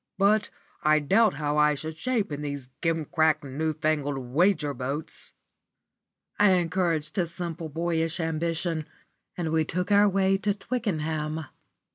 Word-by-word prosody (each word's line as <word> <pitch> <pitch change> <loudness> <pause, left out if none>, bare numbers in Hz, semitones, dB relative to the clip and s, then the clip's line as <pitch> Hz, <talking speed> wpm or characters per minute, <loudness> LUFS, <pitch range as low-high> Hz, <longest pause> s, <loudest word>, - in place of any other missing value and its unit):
But 205 +2 +3 0.3
I 155 0 +4
doubt 195 +8 +3
how 150 0 -1
I 150 0 +4
should 155 +2 -5
shape 215 +2 -1
in 145 0 -4
these 140 -3 -5
gimcrack, 160 -1 +1
new 145 +4 -2
fangled 150 -2 -1
wager 145 +4 +1
boats." 135 +4 -4 1.1
I 205 -2 +6
encouraged 170 -3 0
his 170 -3 0
simple, 170 -2 -5
boyish 165 +1 -1
ambition, 165 0 -1 0.5
and 165 -3 -2
we 160 0 +3
took 180 +5 -2
our 205 0 +6
way 195 0 +2
to 205 0 0
Twickenham. 160 -9 -2
160 Hz, 135 wpm, -27 LUFS, 150-180 Hz, 1.1 s, I